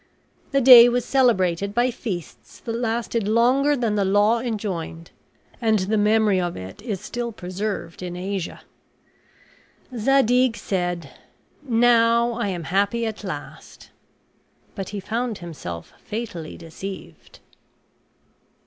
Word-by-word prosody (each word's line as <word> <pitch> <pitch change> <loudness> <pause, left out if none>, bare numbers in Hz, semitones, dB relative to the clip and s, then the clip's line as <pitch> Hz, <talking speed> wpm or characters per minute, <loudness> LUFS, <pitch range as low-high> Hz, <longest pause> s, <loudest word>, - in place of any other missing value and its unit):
The 275 0 +2
day 245 -2 +10
was 245 0 -1
celebrated 200 -7 +1
by 245 +1 +2
feasts 195 - -7
that 230 - -5
lasted 230 -2 -2
longer 255 +6 +3
than 230 -4 0
the 205 -1 +1
law 205 +4 +3
enjoined; 195 -8 -4 0.5
and 220 -2 +3
the 200 +3 -1
memory 210 -2 +3
of 175 -1 -3
it 95 +1 -9
is 210 -4 -4
still 240 +3 -4
preserved 190 -2 -5
in 180 -1 -5
Asia. 185 0 -4 1.3
Zadig 250 0 +3
said, 175 -7 -3 0.5
"Now 235 -2 +3
I 235 -2 -2
am 180 -4 -3
happy 200 +7 0
at 220 -1 -5
last"; - - -9 0.8
but 195 -3 -6
he 205 - -5
found 230 +2 -3
himself 130 - -8
fatally 205 -8 -6
deceived. 185 +4 -10
215 Hz, 120 wpm, -23 LUFS, 185-235 Hz, 1.3 s, day